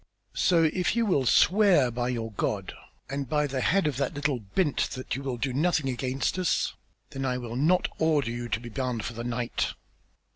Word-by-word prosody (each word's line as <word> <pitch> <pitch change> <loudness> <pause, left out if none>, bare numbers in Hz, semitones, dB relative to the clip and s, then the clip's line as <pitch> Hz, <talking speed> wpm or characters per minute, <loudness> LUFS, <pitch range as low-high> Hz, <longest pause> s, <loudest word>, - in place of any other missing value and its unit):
So 170 -2 +3
if 180 +6 +1
you 235 -1 +2
will 140 - +2
swear 185 - +5
by 120 +1 -2
your 115 -3 -3
God 100 -1 -2 0.3
and 140 -2 -4
by 150 -1 +2
the 135 -2 -2
head 195 +7 +2
of 145 -5 0
that 140 -1 -1
little 145 -3 0
'bint' 140 - 0
that 130 - -4
you 135 - -4
will 135 -3 -3
do 130 +2 -2
nothing 155 0 +1
against 130 +6 -1
us, 180 - +1 0.4
then 135 - -4
I 125 -1 0
will 120 -2 -6
not 160 +8 +3
order 150 -7 +2
you 120 0 -5
to 110 0 0
be 120 0 -9
bound 125 -3 -3
for 115 - -4
the 115 +1 -6
night." 120 0 -2
135 Hz, 205 wpm, -27 LUFS, 120-155 Hz, 0.4 s, swear